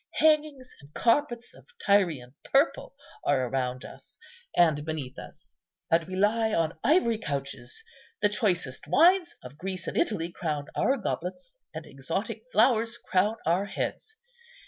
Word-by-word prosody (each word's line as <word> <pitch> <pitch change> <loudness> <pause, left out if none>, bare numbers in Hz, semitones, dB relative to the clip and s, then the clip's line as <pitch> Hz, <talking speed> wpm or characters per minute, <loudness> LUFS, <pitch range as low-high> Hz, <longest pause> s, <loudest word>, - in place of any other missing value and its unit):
Hangings 305 -4 +2
and 140 +1 -17
carpets 240 -1 +1
of - - -18 0.2
Tyrian 165 -11 +2
purple 275 +4 +1 0.3
are 130 - +2
around 125 0 -2
us - - -13 0.4
and 155 -4 +4
beneath 150 -5 -5
us, - - -12 0.3
and 165 0 +3
we 185 +2 -6
lie 220 +3 +2
on 165 -1 0
ivory 235 -9 +3
couches. 145 - -5 0.4
The 205 - +4
choicest 180 - -1
wines 345 - +4
of 130 +3 -11
Greece 185 -1 -5
and - - -5
Italy 175 -5 0
crown 150 -5 -3
our 270 - +2
goblets, 240 - -5
and - - -7
exotic - - -4
flowers 230 - +3
crown 200 +4 +1
our 175 +5 +2
heads. 440 - -5
195 Hz, 140 wpm, -28 LUFS, 155-250 Hz, 0.4 s, and